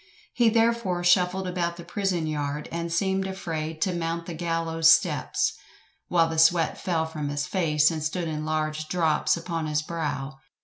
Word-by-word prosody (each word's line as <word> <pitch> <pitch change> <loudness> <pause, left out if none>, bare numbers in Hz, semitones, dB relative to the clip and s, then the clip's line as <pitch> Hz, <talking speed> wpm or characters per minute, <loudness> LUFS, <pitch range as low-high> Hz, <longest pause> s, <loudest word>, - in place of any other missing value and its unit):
He 240 -2 +4
therefore 225 -6 +1
shuffled 180 +1 +3
about 170 -1 -2
the 170 - -8
prison 180 -2 -1
yard, 150 -1 -3
and 170 0 -3
seemed 190 +2 0
afraid 160 -4 -3
to 185 - 0
mount 170 0 -3
the 175 - -6
gallows 165 -1 +1
steps, 160 - +3 0.5
while 165 -2 +3
the 160 -1 -2
sweat 165 0 +4
fell 165 -3 0
from 155 -2 -4
his 145 0 -2
face, 155 -4 +2
and 160 -1 -4
stood 165 +2 -2
in 155 -1 -3
large 155 0 -2
drops 160 -2 +1
upon 165 -2 -3
his 150 0 0
brow. 145 -5 -4
165 Hz, 170 wpm, -26 LUFS, 155-180 Hz, 0.5 s, He